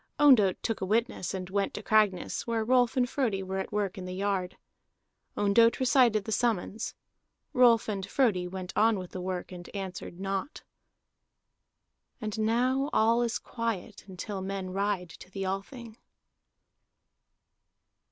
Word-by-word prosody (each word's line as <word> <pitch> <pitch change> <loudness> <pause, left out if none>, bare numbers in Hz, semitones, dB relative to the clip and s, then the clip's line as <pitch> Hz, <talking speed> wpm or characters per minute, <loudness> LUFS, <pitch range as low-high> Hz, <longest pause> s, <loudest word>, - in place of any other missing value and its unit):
Ondott 240 -11 +6
took 225 - -2
a - - 0
witness 225 -3 0
and 185 -2 -4
went 200 0 0
to 210 - -6
Cragness, 210 -3 +1
where 225 -1 0
Rolf 250 +1 +3
and 250 -1 +3
Frodi 230 -8 -1
were 190 +1 -3
at 190 - -4
work 205 -2 -2
in 185 - -6
the 185 0 -5
yard. 190 -2 -2 0.8
Ondott 230 +3 +4
recited 245 -5 +4
the 220 - -4
summons; 220 -1 -1 0.6
Rolf 240 -3 +5
and 200 -3 -2
Frodi 200 -8 +1
went 185 0 -6
on 220 0 +4
with 185 -2 -7
the 185 - -5
work, 185 0 -4
and 175 -1 -9
answered 185 -2 -6
naught. 195 +7 -3 1.6
And 215 -2 -4
now 250 +5 +1
all 230 +2 +3
is 235 -1 0
quiet 230 -3 -4
until 190 +1 -6
men 190 -1 -4
ride 195 -2 -1
to 180 - -13
the 195 0 -4
Althing. 220 +4 -5
205 Hz, 145 wpm, -29 LUFS, 190-230 Hz, 1.6 s, Ondott